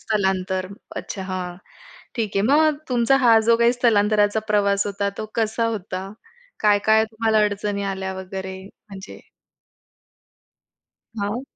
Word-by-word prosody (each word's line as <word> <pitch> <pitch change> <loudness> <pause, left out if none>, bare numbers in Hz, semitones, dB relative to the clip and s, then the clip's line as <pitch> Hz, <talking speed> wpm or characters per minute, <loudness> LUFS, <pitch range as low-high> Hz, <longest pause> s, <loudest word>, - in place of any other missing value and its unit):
स्थलांतर 190 -3 -1 0.3
अच्छा 195 - -5
हां, 185 -2 -5 0.6
ठीक 220 -4 -3
आहे. 195 - +3
मग 305 +2 +4
तुमचा 245 +2 +3
हा 230 -4 +5
जो 230 - +6
काही 235 +1 +4
स्थलांतराचा 210 -3 +2
प्रवास 200 -1 +2
होता 200 0 -2
तो 215 - -4
कसा 225 0 0
होता? 195 -3 -5 0.5
काय 210 -1 +4
काय 220 0 +5
तुम्हाला 220 -1 +1
अडचणी 200 0 -2
आल्या 190 0 -4
वगैरे 190 0 -6
म्हणजे? 195 -1 -12 2.0
हां. 210 +6 -2
205 Hz, 125 wpm, -22 LUFS, 195-225 Hz, 2.0 s, जो